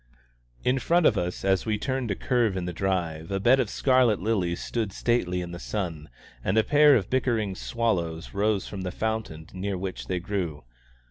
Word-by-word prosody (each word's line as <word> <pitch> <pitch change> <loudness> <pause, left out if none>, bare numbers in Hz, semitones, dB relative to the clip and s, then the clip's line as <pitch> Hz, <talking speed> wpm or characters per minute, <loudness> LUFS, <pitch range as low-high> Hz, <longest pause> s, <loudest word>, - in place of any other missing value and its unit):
In 130 +2 +2
front 170 +5 +2
of 115 - +5
us, 90 0 -3
as 95 +2 +2
we 105 -1 +1
turned 130 +1 -2
a 100 - 0
curve 120 -6 +1
in 90 - -2
the 90 - -4
drive, 85 -3 -2
a 95 0 -1
bed 120 +7 +5
of 120 -5 +1
scarlet 130 -6 +3
lilies 95 -4 0
stood 110 -4 -2
stately 90 -5 0
in 85 -1 -6
the 85 - -7
sun, 85 -8 -4 0.3
and 95 +4 0
a 110 - +5
pair 150 +1 +6
of 100 -6 +1
bickering 115 -6 +1
sparrows 90 -7 -2
rose 100 -1 +1
from 100 - -6
the 95 - -3
fountain 110 -7 -3
near 95 +1 -3
which 95 0 -5
they 90 - -1
grew. 85 -6 -3
100 Hz, 195 wpm, -26 LUFS, 90-115 Hz, 0.3 s, pair